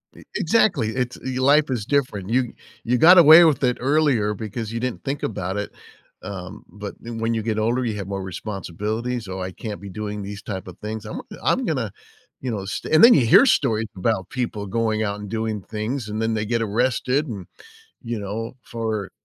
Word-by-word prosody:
E - - -14
exactly, 200 - +2
it's 125 -1 -2
y 130 -1 -3
life 145 +3 +4
is 120 -6 -2
different. 115 -9 -1
You 120 0 +1 0.3
you 125 +2 +1
got 175 +8 +8
away 165 0 +10
with 155 -4 +3
it 125 -1 +2
earlier 135 -6 +2
because 110 +1 -5
you 115 - -3
didn't 125 0 -3
think 140 +1 -3
about 95 -2 -3
it, 105 - -3 0.5
um, 95 -2 -7
but 105 -1 -8
then 115 -1 -7
when 115 +1 0
you 110 -2 -1
get 110 -1 -1
older, 120 +4 +1
you 115 -3 -2
have 100 -2 -5
more 100 -1 -4
responsibilities, 105 +5 -4
so, 95 0 -5
"I 90 0 -4
can't 105 +2 -7
be 100 - -8
doing 105 +2 -5
these 100 0 -7
type 95 -3 -6
of 90 - -10
things. 110 0 -5
Imma - - -5 0.2
I'm - - +2
gonna, - - -1 0.5
you 130 - -3
know, 100 -4 -4
st" 100 +9 -4
and 155 - +7
then 235 +1 +10
you 130 - +4
hear 115 - +7
stories 115 - +2
about 95 0 -1
people 120 -5 -3
going 110 +1 0
out 100 -1 -2
and 105 -1 -7
doing 110 -1 -2
things, 110 +5 -4
and 105 +1 -3
then 110 0 0
they 105 -1 -1
get 115 +1 0
arrested 125 +6 0
and, 100 -7 -7 0.6
you 115 -2 -3
know, 110 +5 -5
for 110 -4 -3
110 Hz, 210 wpm, -23 LUFS, 105-125 Hz, 0.6 s, away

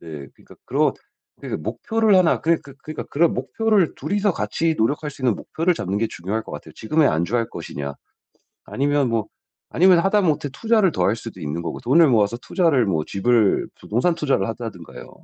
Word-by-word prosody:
네 75 -4 -9
그러니까 - - -18
그런 - - +1 0.5
그러니까 - - -5
목표를 210 - +1
1 180 -3 +3
그런 165 0 +2
그 140 -1 -13
그러니까 155 -1 -6
그런 165 +3 +1
목표를 190 - +1
2 - - -5
이서 205 -1 +2
같이 160 +8 -1
노력할 145 +6 0
수 135 - -13
있는 120 -5 +3
목표를 170 +2 -1
잡는 100 - -2
게 115 - +1
중요할 100 +6 -4
것 - - -11
같아요. - - -9
지금에 150 +7 +1
안주할 110 +8 0
것이냐. 70 0 -6 0.7
아니면 140 -1 0
뭐 115 -2 -1 0.4
아니면 180 0 +5
하다못해 175 -7 +1
투자를 220 0 +2
더할 105 -4 +1
수도 115 -4 -9
있는거고 80 +3 -4
돈을 160 +6 +5
모아서 110 0 +2
투자를 145 - +1
뭐 80 -6 0
집을 110 +1 +2
부동산 145 +11 0
투자를 135 - 0
한다든가요. 110 -7 -8
130 Hz, 400 characters per minute, -22 LUFS, 105-170 Hz, 0.7 s, 아니면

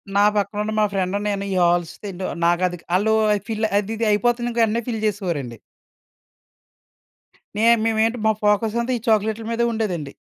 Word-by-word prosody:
నా 200 - +5
పక్కన 205 0 -1
ఉన్న 215 - -3
మా - - +4
ఫ్రెండ్, 190 0 -1
నేను 200 -1 -2
ఈ - - -1
హాల్స్ 175 -1 +1
తింటూ 190 -2 -5 0.2
నాకది 175 +1 +1 0.2
ఆళ్ళు 220 +4 +2 0.3
ఫిల్ 220 -1 -1
అది 210 +2 -1
ఇది 230 - 0
అయిపోతుంది. 240 +3 +1
ఇంకా 235 0 0
వెంటనే 225 +2 +1
ఫిల్ 225 -2 -2
చేసేవారండి. 170 - -3 2.0
నేమ్ 230 +1 +4
మేమేంటి 225 +2 +1
మా 220 - +5
ఫోకస్ 210 +2 +2
అంతా, 255 +2 -2
ఈ - - -10
చాక్లేట్‌ల 220 +1 +1
మీదే 235 +1 +1
ఉండేదండి. 180 -10 -3
210 Hz, 165 wpm, -22 LUFS, 185-225 Hz, 2.0 s, నా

